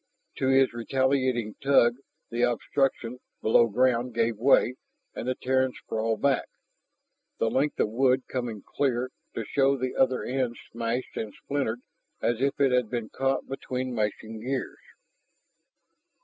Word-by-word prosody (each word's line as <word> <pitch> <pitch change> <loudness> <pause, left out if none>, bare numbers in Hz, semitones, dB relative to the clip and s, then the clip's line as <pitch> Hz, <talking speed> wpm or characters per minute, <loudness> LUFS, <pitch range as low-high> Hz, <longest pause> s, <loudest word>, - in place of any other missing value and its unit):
To 130 - 0
his 135 -1 +4
retaliating 130 -2 0
tug 125 -3 +4 0.3
the 120 +1 -1
obstruction 125 0 0 0.2
below 115 +1 +4
ground 125 +1 +1
gave 115 0 +2
way, 125 0 +4 0.4
and - - -5
the 130 - 0
Terran 130 0 +1
sprawled 110 0 -2
back, 140 -1 +2 0.9
the 115 - +1
length 145 +3 0
of - - +2
wood 130 +2 +3
coming 120 -5 -4
clear, 130 -2 -1 0.2
to 115 - -3
show 135 +3 +2
the 130 0 -3
other 130 -1 +2
end 125 -2 -1
smashed 115 +2 -3
and 110 -2 -3
splintered 135 -5 -2 0.4
as 120 +1 0
if 140 0 0
it 140 -2 +4
had 125 -3 +2
been 120 -3 -3
caught 135 0 -1
between 130 -1 -4
mashing 110 0 -2
gears. 130 +3 -3
125 Hz, 140 wpm, -27 LUFS, 115-130 Hz, 0.9 s, his